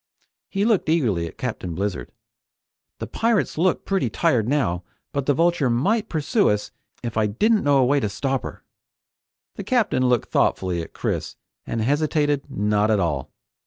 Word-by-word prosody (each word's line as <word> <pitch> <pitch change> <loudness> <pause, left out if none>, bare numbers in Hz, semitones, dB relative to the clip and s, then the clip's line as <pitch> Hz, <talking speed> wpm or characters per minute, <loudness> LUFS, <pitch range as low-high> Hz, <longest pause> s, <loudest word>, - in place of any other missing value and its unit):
He 200 +1 0
looked 220 -8 +2
eagerly 110 - +1
at - - -12
Captain 100 -9 -4
Blizzard. 95 -9 -3 0.9
"The - - -5
pirates 230 -2 0
look 175 +3 +1
pretty 195 -1 0
tired 125 -10 +1
now, 95 -12 0 0.3
but 140 -2 -2
the 145 - +4
Vulture 165 -4 +2
might 205 - +1
pursue 185 - +1
us 105 0 -1 0.3
if 115 -2 -4
I 110 -1 +3
didn't 210 - +2
know 145 -1 +4
a 130 - +4
way 140 +3 +3
to 105 - -1
stop 130 +7 -1
her!" - - -8 0.9
The - - -4
Captain 235 - +1
looked 125 -2 +1
thoughtfully 90 -2 +1
at 80 - -9
Chris - - -3 0.3
and 115 - -2
hesitated 145 +2 +1
not 105 -2 +1
at 105 -2 +3
all. 75 -5 -1
130 Hz, 165 wpm, -23 LUFS, 105-165 Hz, 0.9 s, the